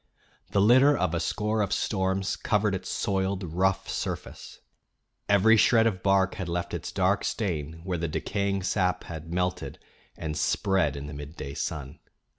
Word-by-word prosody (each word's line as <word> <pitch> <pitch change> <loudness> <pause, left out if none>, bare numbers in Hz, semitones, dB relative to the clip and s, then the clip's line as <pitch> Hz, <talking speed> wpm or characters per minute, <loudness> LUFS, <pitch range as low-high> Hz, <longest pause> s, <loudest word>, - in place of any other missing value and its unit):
The 100 - +2
litter 130 +7 +6
of 80 - 0
a 85 - 0
score 105 +5 -1
of 100 - -1
storms 95 -1 0
covered 105 -2 +1
its 95 -1 -4
soiled 95 -1 -1
rough 95 +3 0
surface; - - -5 0.7
every 105 +3 +5
shred 115 +1 +5
of 95 -5 0
bark 95 -1 +3
had 90 -4 -5
left 85 0 -3
its 85 -1 -4
dark 95 +1 +1
stain 80 -6 -3
where 90 -2 -2
the 85 - -1
decaying 100 +4 -1
sap 90 -2 0
had 80 0 -8
melted 90 +1 -2 0.4
and 80 -2 -4
spread 95 -4 +1
in 70 0 -6
the 75 - -7
midday 70 -1 -7
sun. 70 +1 -5
95 Hz, 160 wpm, -27 LUFS, 85-100 Hz, 0.7 s, litter